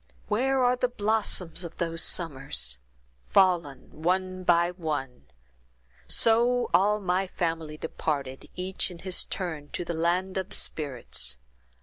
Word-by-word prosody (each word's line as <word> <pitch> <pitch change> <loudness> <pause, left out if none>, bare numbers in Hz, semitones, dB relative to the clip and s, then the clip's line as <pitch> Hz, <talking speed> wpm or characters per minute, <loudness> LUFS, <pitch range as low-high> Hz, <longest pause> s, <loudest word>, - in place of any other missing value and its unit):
"Where 260 +5 +2
are 245 0 +4
the 250 0 +1
blossoms 205 -6 0
of 170 -1 -8
those 165 -1 -1
summers!—fallen, 135 - 0
one 185 +2 0
by 175 0 +4
one; 150 -8 -4 0.8
so 240 +2 +3
all 210 +3 +4
of 210 - -10
my 185 +1 +1
family 165 -4 -2
departed, 140 -4 -3
each 185 +2 -1
in 175 - -9
his 185 +1 0
turn, 160 -6 -4
to 175 - -3
the 170 - -3
land 180 +3 0
of 190 +1 -3
spirits. 140 -6 -1
175 Hz, 125 wpm, -28 LUFS, 150-190 Hz, 0.8 s, are